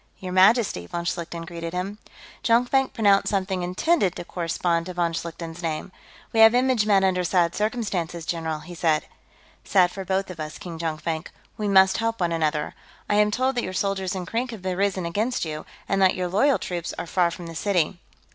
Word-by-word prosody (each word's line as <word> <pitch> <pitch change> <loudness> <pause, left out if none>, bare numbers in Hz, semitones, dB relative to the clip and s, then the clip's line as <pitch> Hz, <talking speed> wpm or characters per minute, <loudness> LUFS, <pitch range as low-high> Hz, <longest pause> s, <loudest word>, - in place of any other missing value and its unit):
"Your 185 -1 -6
Majesty," 190 - +4
von 170 - -4
Schlichten 170 -1 -4
greeted 170 -1 -6
him. 195 +4 -4 0.4
Jonkvank 250 +3 +3
pronounced 200 -3 +3
something 190 -2 -1
intended 185 - +1
to - - -6
correspond 170 0 -1
to 180 - -6
von 170 -1 0
Schlichten's 165 0 -6
name. 165 +2 -3 0.4
"We 225 - +1
have 225 +1 +8
image 250 -4 +2
met 200 -2 +4
under 185 -1 +2
sad 175 -1 +2
circumstances, 195 -7 -2
general," 160 -2 -3
he 175 +4 -10
said. 160 -3 +1 0.6
"Sad 180 -3 +3
for 195 - -6
both 190 0 -1
of 170 - -10
us, 155 0 -5
King 170 -3 -8
Jonkvank; 160 0 -3 0.3
we 215 -2 -2
must 190 -1 +5
help 225 0 -1
one 175 -2 +1
another. 155 -2 0 0.3
I 205 - +2
am 210 0 +4
told 255 +5 +1
that 240 - +1
your 185 - -4
soldiers 190 -1 -1
in 185 -1 -4
Krink 235 +7 -2
have 215 -6 -8
risen 190 0 0
against 210 +6 -1
you, 155 -1 -6 0.2
and 195 0 +1
that 190 -1 +5
your 180 -1 -2
loyal 265 +10 +3
troops 175 -2 -4
are - - -4
far 175 0 +2
from 170 +1 -8
the 165 - -7
city." 175 -1 0
185 Hz, 195 wpm, -24 LUFS, 170-205 Hz, 0.6 s, have